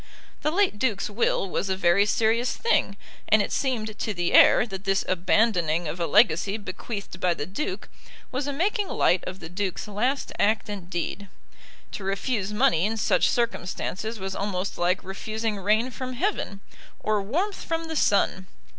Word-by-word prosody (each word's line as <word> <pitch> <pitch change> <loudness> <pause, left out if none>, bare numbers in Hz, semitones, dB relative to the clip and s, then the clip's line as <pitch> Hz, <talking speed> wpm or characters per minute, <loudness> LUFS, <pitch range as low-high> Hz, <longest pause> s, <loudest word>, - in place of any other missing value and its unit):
The 305 - +1
late 365 - +1
Duke's 210 -5 0
will 205 -2 +1
was 190 +1 -2
a 190 - 0
very 190 +2 +4
serious 230 +3 +1
thing, 460 - +1 0.3
and 215 - +6
it - - -5
seemed 220 -5 -2
to 215 - -2
the 175 -1 -1
heir - - +7
that 195 -4 -7
this 195 -1 +1
abandoning 175 -3 +2
of 155 +4 -5
a 170 - 0
legacy 200 0 +3
bequeathed 200 -1 -7
by 180 -2 +2
the 145 - -4
Duke 300 - -4 0.4
was 265 +2 -2
a - - 0
making 395 - 0
light 180 - +2
of 185 +1 -6
the 165 - -8
Duke's 185 +3 -3
last 245 +7 -1
act 215 +1 +2
and 195 -4 -6
deed. 190 +3 -3 0.6
To 205 - -6
refuse 200 +1 -1
money 210 -6 +3
in 225 +1 -2
such - - +3
circumstances 220 -1 -2
was 190 -1 -5
almost 195 -1 -2
like 180 +2 +1
refusing 215 +3 -3
rain 215 +6 +2
from 255 +1 -5
heaven, 250 - -2 0.4
or 215 -1 0
warmth 345 - -2
from 330 -1 -2
the 320 0 -5
sun. 195 -7 +2
205 Hz, 170 wpm, -25 LUFS, 190-240 Hz, 0.6 s, heir